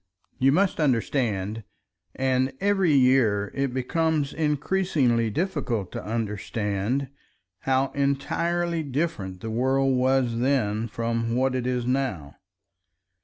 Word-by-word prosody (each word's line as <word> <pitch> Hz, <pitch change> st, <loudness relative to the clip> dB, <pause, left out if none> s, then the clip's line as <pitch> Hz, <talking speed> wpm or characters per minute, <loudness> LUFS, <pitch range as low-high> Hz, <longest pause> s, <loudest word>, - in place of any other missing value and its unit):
You 135 Hz, +1 st, +4 dB
must 190 Hz, +5 st, +2 dB
understand—and 125 Hz, +1 st, -1 dB
every 195 Hz, -4 st, +2 dB
year 125 Hz, -6 st, +3 dB
it 140 Hz, -1 st, -1 dB
becomes 145 Hz, +3 st, 0 dB
increasingly 150 Hz, -6 st, +1 dB
difficult 120 Hz, -, -2 dB
to -, -, -6 dB
understand—how 110 Hz, +3 st, -3 dB
entirely 165 Hz, +5 st, 0 dB
different 130 Hz, -, -3 dB
the 110 Hz, -, -4 dB
world 130 Hz, +3 st, +2 dB
was 125 Hz, -2 st, +1 dB
then 115 Hz, -4 st, +1 dB
from 115 Hz, +1 st, -2 dB
what 130 Hz, +1 st, +1 dB
it 125 Hz, -1 st, -2 dB
is 125 Hz, -1 st, -1 dB
now. 125 Hz, -, -2 dB
130 Hz, 100 wpm, -25 LUFS, 115-140 Hz, -, You